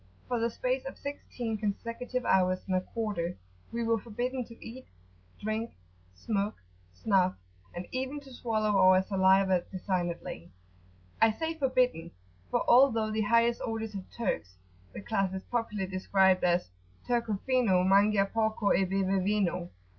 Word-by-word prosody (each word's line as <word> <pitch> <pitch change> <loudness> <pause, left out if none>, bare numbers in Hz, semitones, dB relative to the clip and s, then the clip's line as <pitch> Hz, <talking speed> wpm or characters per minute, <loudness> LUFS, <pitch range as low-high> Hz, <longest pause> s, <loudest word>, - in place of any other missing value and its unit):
For 245 -1 -1
the 230 +1 +1
space 255 +3 -2
of 270 - -7
sixteen 245 -6 -5
consecutive 230 +4 -3
hours 185 -1 +3
and 185 - -1
a 185 - +2
quarter, 200 - -3 0.3
we 235 0 -2
were 230 0 +1
forbidden 245 +4 -3
to 230 0 -14
eat, 255 +3 -10 0.5
drink, 220 +2 -3 0.4
smoke, 205 - -2 0.4
snuff, 185 - +1 0.4
and 175 +1 -5
even 265 +3 -3
to 270 -2 -14
swallow 215 -3 0
our 185 0 +6
saliva 190 -1 +3
designedly. 175 - -3 0.7
I 225 0 +6
say 320 +9 -3
forbidden, 255 - +1 0.4
for - - 0
although 235 -4 +5
the 215 0 0
highest 230 +2 +3
orders 225 -2 -3
of 195 -2 -6
Turks, 90 - -3 0.4
the - - -8
class 195 -3 -1
is 190 - -5
popularly 220 -5 -2
described 190 0 +3
as 175 - +1 0.3
"Turco 235 -4 0
fino 235 -9 +3
Mangia 200 +1 +4
porco 220 0 +1
e 195 - +3
beve 190 0 0
vino." 190 -3 0
210 Hz, 145 wpm, -30 LUFS, 190-235 Hz, 0.7 s, our